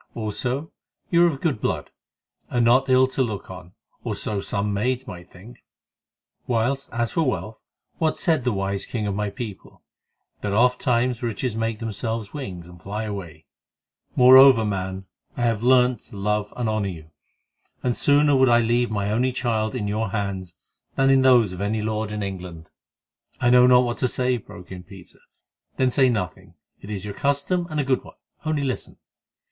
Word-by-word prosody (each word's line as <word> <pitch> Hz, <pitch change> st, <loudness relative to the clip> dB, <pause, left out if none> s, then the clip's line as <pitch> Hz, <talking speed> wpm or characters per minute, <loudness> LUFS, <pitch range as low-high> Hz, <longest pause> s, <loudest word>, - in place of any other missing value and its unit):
Also, 125 Hz, +7 st, -3 dB, 0.4 s
you 170 Hz, 0 st, +5 dB
are -, -, +6 dB
of 140 Hz, -4 st, -6 dB
good 140 Hz, -10 st, -1 dB
blood, -, -, -2 dB, 0.6 s
and 120 Hz, -1 st, +1 dB
not 130 Hz, +3 st, +4 dB
ill 130 Hz, 0 st, +5 dB
to 130 Hz, +1 st, -2 dB
look 110 Hz, -7 st, -3 dB
on, 90 Hz, -1 st, -11 dB, 0.3 s
or -, -, -3 dB
so 105 Hz, -2 st, -2 dB
some 100 Hz, +1 st, -2 dB
maids 125 Hz, +5 st, -1 dB
might 90 Hz, -7 st, -10 dB
think; 110 Hz, +7 st, -15 dB, 0.8 s
whilst 125 Hz, +3 st, -1 dB
as 120 Hz, 0 st, -1 dB
for 165 Hz, -, 0 dB
wealth, 115 Hz, -6 st, -2 dB, 0.4 s
what 160 Hz, -1 st, +1 dB
said 160 Hz, -7 st, +1 dB
the 125 Hz, -, +1 dB
wise 100 Hz, -1 st, -2 dB
king 110 Hz, -3 st, -3 dB
of 100 Hz, -, -1 dB
my 105 Hz, +1 st, -2 dB
people?—that 105 Hz, -1 st, -10 dB
ofttimes 125 Hz, +1 st, +2 dB
riches 115 Hz, 0 st, -2 dB
make 115 Hz, 0 st, -2 dB
themselves 110 Hz, 0 st, -4 dB
wings 95 Hz, -, -6 dB
and 90 Hz, -1 st, -15 dB
fly 105 Hz, +5 st, -4 dB
away. 90 Hz, -7 st, -7 dB, 0.7 s
Moreover, 130 Hz, -2 st, +8 dB
man, 95 Hz, -1 st, -3 dB, 0.3 s
I 120 Hz, -, -1 dB
have 115 Hz, -3 st, +1 dB
learned 125 Hz, -1 st, +4 dB
to 105 Hz, -, -13 dB
love 105 Hz, +1 st, -1 dB
and 120 Hz, -2 st, -1 dB
honour 110 Hz, -2 st, -1 dB
you, 80 Hz, -3 st, -10 dB, 0.7 s
and 125 Hz, -2 st, 0 dB
sooner 145 Hz, 0 st, +4 dB
would 130 Hz, -1 st, +4 dB
I 120 Hz, 0 st, +5 dB
leave 120 Hz, +1 st, +1 dB
my 100 Hz, -1 st, -2 dB
only 125 Hz, +4 st, +1 dB
child 115 Hz, -4 st, -1 dB
in 105 Hz, -5 st, -2 dB
your 110 Hz, +1 st, -1 dB
hands 95 Hz, -3 st, -4 dB, 0.4 s
than 135 Hz, 0 st, +3 dB
in 135 Hz, 0 st, +5 dB
those 120 Hz, -7 st, +4 dB
of 90 Hz, -, -7 dB
any 105 Hz, +1 st, -1 dB
lord 110 Hz, 0 st, -2 dB
in 105 Hz, -1 st, -3 dB
England." 90 Hz, -5 st, -7 dB, 0.7 s
"I 120 Hz, -, +3 dB
know 125 Hz, 0 st, +7 dB
not 125 Hz, 0 st, +6 dB
what 120 Hz, -1 st, -3 dB
to 130 Hz, -, +2 dB
say," 125 Hz, 0 st, 0 dB
broke 90 Hz, -5 st, -13 dB
in 90 Hz, -1 st, -7 dB
Peter. 95 Hz, -1 st, -15 dB, 0.6 s
"Then 130 Hz, -1 st, +2 dB
say 130 Hz, 0 st, +4 dB
nothing. 95 Hz, -5 st, -4 dB, 0.3 s
It 100 Hz, -, -11 dB
is 100 Hz, -2 st, -5 dB
your 105 Hz, -, -5 dB
custom, 145 Hz, -, 0 dB
and 155 Hz, -1 st, -2 dB
a -, -, +2 dB
good 130 Hz, -1 st, +1 dB
one—only 155 Hz, -2 st, -5 dB
listen. 130 Hz, -2 st, -4 dB
115 Hz, 180 wpm, -23 LUFS, 100-130 Hz, 0.8 s, Moreover